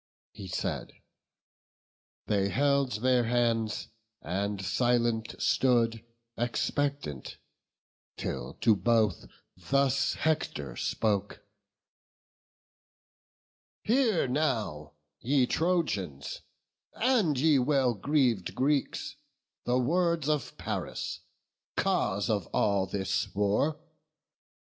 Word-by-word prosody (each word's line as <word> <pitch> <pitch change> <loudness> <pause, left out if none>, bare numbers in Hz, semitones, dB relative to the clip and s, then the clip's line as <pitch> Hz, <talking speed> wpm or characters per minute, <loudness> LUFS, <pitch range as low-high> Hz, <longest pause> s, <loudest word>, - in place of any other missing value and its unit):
He 95 - -9
said; 90 - -3 1.3
they 100 -1 +1
held 140 -3 +1
their 125 -2 +3
hands, 115 -2 0 0.3
and 100 +3 -2
silent 115 +3 +1
stood 115 -3 +2 0.3
Expectant, 120 - -2 0.8
till - - -4
to 110 -3 +5
both 105 -1 +1 0.3
thus 135 +7 +1
Hector 150 - -1
spoke: 105 -2 -1 2.4
"Hear 225 - +2
now, 115 - -1 0.3
ye 130 +1 +2
Trojans, 125 - -1 0.5
and 220 - +2
ye 150 -1 +4
well 130 -1 +2
greav'd 120 -3 +1
Greeks, 140 +1 0 0.5
The 125 +1 +2
words 165 +3 +1
of 150 -4 -1
Paris, - - -4 0.6
cause 100 +1 +1
of 105 -6 0
all 100 -2 +1
this 95 0 -2
war. 105 +10 +1
120 Hz, 85 wpm, -29 LUFS, 100-140 Hz, 2.4 s, to